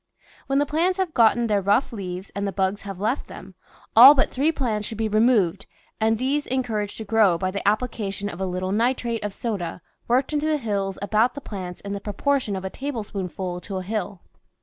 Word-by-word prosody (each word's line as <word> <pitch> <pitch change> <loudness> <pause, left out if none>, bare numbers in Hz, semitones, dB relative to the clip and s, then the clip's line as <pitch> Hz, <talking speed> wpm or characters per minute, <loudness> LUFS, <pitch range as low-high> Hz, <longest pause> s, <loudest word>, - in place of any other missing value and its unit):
When 275 - +1
the 290 - +3
plants 340 +6 +1
have 375 -4 -1
gotten 235 0 +4
their 210 -3 +1
rough 205 +7 +2
leaves 185 -2 -6
and 200 0 -2
the - - -2
bugs 190 +1 -1
have 195 -2 -7
left 220 +7 -1
them, - - -11 0.4
all 260 +6 +11
but 270 - +2
three 285 +5 +2
plants 225 -8 -2
should 225 - -6
be 220 0 0
removed 215 -4 +2 0.3
and 220 0 +2
these 275 +5 -1
encour 245 -5 -1
aged 205 - -12
to 220 - -6
grow 210 -5 +4
by 185 +1 -2
the 200 +1 -4
application 210 -2 -1
of 190 -2 -7
a 190 - 0
little 185 +1 -3
nitrate 235 +1 0
of 210 - -2
soda 195 -7 -4 0.3
worked 255 +5 +1
into 300 +1 0
the 310 -1 +2
hills 200 -6 -2
about 220 +5 +2
the - - -4
plants 185 -7 -7
in 200 0 -5
the 200 - -4
proportion 220 +2 -1
of 190 0 -5
a 190 - -4
tablespoonful 195 -9 -4
to 195 0 -5
a 185 - -4
hill. 205 -1 -4
215 Hz, 215 wpm, -24 LUFS, 195-250 Hz, 0.4 s, all